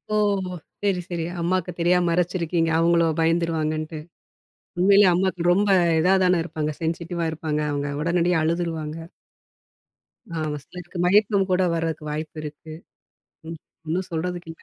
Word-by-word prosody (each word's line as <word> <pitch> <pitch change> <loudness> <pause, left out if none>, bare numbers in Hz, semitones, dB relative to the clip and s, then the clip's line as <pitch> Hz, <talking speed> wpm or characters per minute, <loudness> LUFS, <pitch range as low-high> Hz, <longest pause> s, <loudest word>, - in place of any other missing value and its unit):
ஓஹோ! 200 -3 +1 0.3
சேரி, 195 -3 +1
சேரி. 170 -2 -3 0.2
அம்மாக்கு 180 +1 0
தெரியாம 175 +1 +3
மறைச்சிருக்கீங்க, 170 -1 0
அவுங்களோ 170 0 +3
பயந்துடுவாங்கன்ட்டு. 160 -1 0 0.8
உண்மையிலே 200 +2 +6
அம்மாக்கு 185 0 0
ரொம்ப 200 +3 +2 0.3
இதா 185 +4 +4
தானே 180 -1 +3
இருப்பாங்க. 155 -3 -3
சென்சிட்டிவா 170 +1 -2
இருப்பாங்க, 155 -1 -3
அவங்க 145 0 -2
உடனடியா 170 +1 +2
அழுதுருவாங்க. 165 -2 -2 1.4
ஆமா. 155 -1 -2
சிலருக்கு 180 +3 -9
மயக்கம் 200 +1 +3
கூட 180 - +3
வரக்கு 165 -2 -2
வாய்ப்பு 155 +1 -5
இருக்கு. 155 +1 -9 0.8
ம், 165 - -6 0.3
ஒண்ணும் 180 +4 -2
சொல்றதுக்கு 175 +1 -4
இல்ல. 165 - -20
170 Hz, 125 wpm, -23 LUFS, 160-180 Hz, 1.4 s, உண்மையிலே